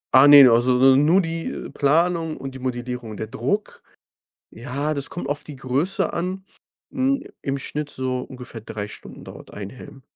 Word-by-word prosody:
Ah, 135 +2 +8
ne. 145 -2 +10
Also 125 +1 +3
n 140 +3 +4
nur 180 +5 +5
die, 165 0 -4
äh, - - -6
Planung 165 +2 +1
und 135 -1 -7
die 130 - -9
Modellierung. 125 -3 -5
Der - - -4
Druck, 130 - -3 0.7
ja, 140 +6 -3
das 140 -1 -4
kommt 165 -5 -6
auf 145 0 -3
die 150 - -9
Größe 135 +9 -1
an. 185 +3 -4 0.4
Hm, 275 0 0 0.2
im 135 0 -2
Schnitt, 150 +2 -5
so 130 -1 -3
ungefähr 125 -3 -9
3 105 -1 -6
Stunden - - -12
dauert - - -12
1 100 -1 -7
Helm. 130 +3 -13
135 Hz, 175 wpm, -22 LUFS, 125-165 Hz, 0.7 s, ne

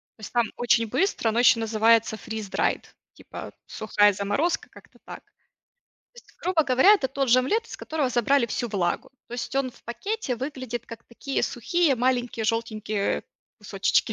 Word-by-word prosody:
То - - -40
есть 210 - -9
там 240 -1 +3
очень 230 -1 +2
быстро, 255 - 0
оно 225 +2 0
ещё 240 -1 +6
называется 225 0 +3
freeze 220 -2 -6
dried. - - 0 0.3
Типа - - -10
сухая 205 -1 +2
заморозка, 205 - -1
как-то - - -18
так. - - -8
То - - -42 0.6
есть 480 - -17
грубо 360 -3 +2
говоря, 265 +9 +6
это 275 -10 -1
тот 270 0 -1
же 245 +2 +6
омлет 435 - 0
из - - -8
которого 310 -4 -2
забрали 250 +2 +2
всю 240 +1 -3
влагу. 200 +6 -1 0.2
То 240 - -7
есть 245 +2 -5
он 270 -2 0
в - - -22
пакете 330 - -3
выглядит 255 -3 -5
как 230 0 -10
такие 265 +3 -4
сухие 345 -6 +1
маленькие 245 -2 0
желтенькие, 215 -2 -2 0.2
э, - - -11 0.4
кусочечки. 205 +1 0
240 Hz, 175 wpm, -25 LUFS, 220-270 Hz, 0.6 s, ещё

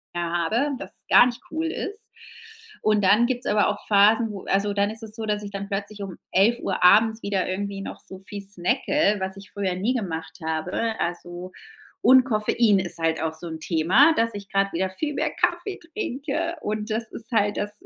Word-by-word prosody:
habe 175 - 0
das - - -9 0.2
gar - - +8
nicht 245 -2 -3
cool 320 +1 -2
ist. 415 +6 -5 0.8
Und 215 -1 +2
dann 205 +5 +5
gibt's 250 0 -2
aber 210 -1 +3
auch 210 - -5
Phasen, 215 +2 +5
wo 195 -2 -8
also 200 +1 +1
dann 200 0 +1
ist 220 +1 -7
es 215 -1 -6
so, 225 -1 -5
dass 210 -1 -1
ich 200 - -7
dann 200 0 -6
plötzlich 205 +1 -4
um 190 -3 -7
11:00 195 -1 +2
abends 220 +4 +5
wieder 200 -2 -1
irgendwie 200 +1 -3
noch - - -7
so 190 - -8
viel 200 +1 -8
snacke, 210 - +1
was 190 0 -4
ich 195 0 -12
früher 195 -2 -2
nie 205 +7 0
gemacht 165 -7 -4
habe. 180 +8 -2
Also 175 +1 -4 0.5
und 260 0 +6
Koffein 215 -2 +2
ist 175 -2 -2
halt 165 0 0
auch 160 -1 -1
so 160 +2 -7
'n 160 -1 -6
Thema, 180 - +4
dass 230 0 +1
ich 200 -1 -8
grad 195 0 +1
wieder 190 +3 0
viel 295 +11 -3
mehr - - -1
Kaffee 400 -3 -1
trinke. 330 - -3
Und 210 +1 -3
das 220 0 -2
ist 235 +2 -7
halt 205 -3 +2
das 205 0 -2
205 Hz, 200 wpm, -24 LUFS, 190-230 Hz, 0.8 s, gar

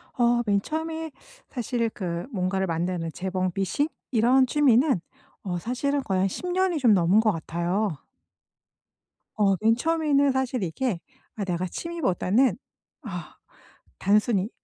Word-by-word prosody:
어. 240 -1 +3
맨 200 -2 +2
처음에 320 +3 -4 0.4
사실 240 -2 -1
그 175 -5 -4
뭔가를 190 -2 -1
만드는 165 0 -2
재봉 185 0 -2
미싱? 195 - 0 0.2
이런 250 +3 +4
취미는 265 - +3 0.4
어 180 -3 -2
사실은 275 +7 -1
거의 190 -5 0
한 195 - +3
10 360 - -5
년이 370 -2 +1
좀 240 -6 +5
넘은 185 +2 +4
것 220 -1 +3
같아요. 175 +2 -2 1.4
어 200 -2 +4
맨 225 +1 +4
처음에는 290 0 +2
사실 260 -3 -1
이게 185 +3 -2 0.4
아 205 - -3
내가 180 0 -1
취미보다는 245 - 0 0.5
아, 180 - -7 0.8
단순히 210 -3 -1
220 Hz, 250 characters per minute, -26 LUFS, 185-265 Hz, 1.4 s, 좀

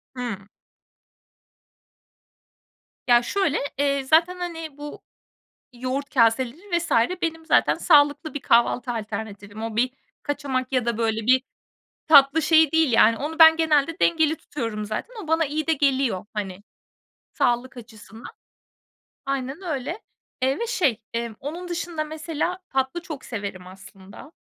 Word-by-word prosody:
Hımm. 225 -6 -5 2.6
Ya, 240 -1 +6
şöyle, 330 +2 0 0.2
eee, 280 -1 +1
zaten, 330 +6 +3
hani, 330 -4 -6
bu 295 0 -9 0.7
yoğurt 260 +4 -4
kaseleri 260 - +1
vs. 340 - -6 0.3
benim 325 -1 -2
zaten - - +3
sağlıklı 295 -1 +3
bir 290 - -4
kahvaltı 240 0 +2
alternatifim. 210 -1 -6
O 225 -1 -5
bir 250 +2 +2 0.3
kaçamak 275 -3 -3
ya 255 -3 +1
da, 235 -2 -1
böyle, 225 -1 -1
bir 255 +1 +4 0.7
tatlı 285 +1 +6
şeyi 315 -1 +4
değil, 320 -6 +3
yani. 225 0 +5
Onu 315 +4 -5
ben 320 0 +9
genelde 320 0 +1
dengeli 320 -2 +2
tutuyorum 230 -8 -5
zaten. 215 - -5
O - - -13
bana 325 +1 +2
iyi 305 +2 -3
de 325 - +2
geliyor, 270 -8 +1
hani, 195 -2 -5 0.7
sağlık 245 +1 0
açısından. 225 0 -12 1.0
Aynen 275 +4 -3
öyle, 325 - -4 0.4
eee, 265 +2 +1
ve 470 - -2
şey, 275 - 0
emm, 230 -1 -3
onun 335 +6 -6
dışında, 340 -2 -3
mesela, 315 +3 -3
tatlı 265 +5 -2
çok 310 -5 -8
severim, 200 -5 -6
aslında. 195 - -14
275 Hz, 130 wpm, -23 LUFS, 230-320 Hz, 2.6 s, ben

